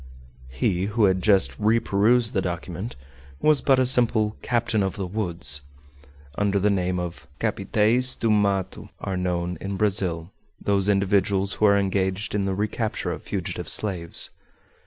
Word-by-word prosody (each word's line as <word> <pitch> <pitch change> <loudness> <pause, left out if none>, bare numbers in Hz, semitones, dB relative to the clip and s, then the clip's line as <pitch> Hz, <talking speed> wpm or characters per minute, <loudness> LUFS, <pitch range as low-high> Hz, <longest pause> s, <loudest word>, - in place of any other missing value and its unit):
He 90 +8 -1
who 105 +2 0
had 95 -1 +2
just 100 -1 +3
reperused 115 +2 +2
the 95 - +1
document 90 +3 -5 0.4
was 155 - +3
but 135 -2 +3
a 130 - +3
simple 115 -4 +3
"captain 115 -3 0
of 95 -1 -1
the 100 - -3
woods." 85 -8 -1 0.7
Under 100 -1 +1
the 100 +1 +2
name 90 -2 0
of 90 -1 -6
"Capitaes 110 +4 +1
do 115 - 0
Mato" 100 -3 0
are 95 - -3
known 90 -2 -2
in 100 0 -4
Brazil 95 -4 -1 0.3
those 100 0 +1
individuals 100 0 +1
who 110 - +1
are 100 -1 +5
engaged 95 0 -1
in 100 -1 0
the 95 -1 -1
recapture 105 +2 -2
of - - -6
fugitive - - -4
slaves. 90 -6 -1
100 Hz, 150 wpm, -24 LUFS, 95-110 Hz, 0.7 s, are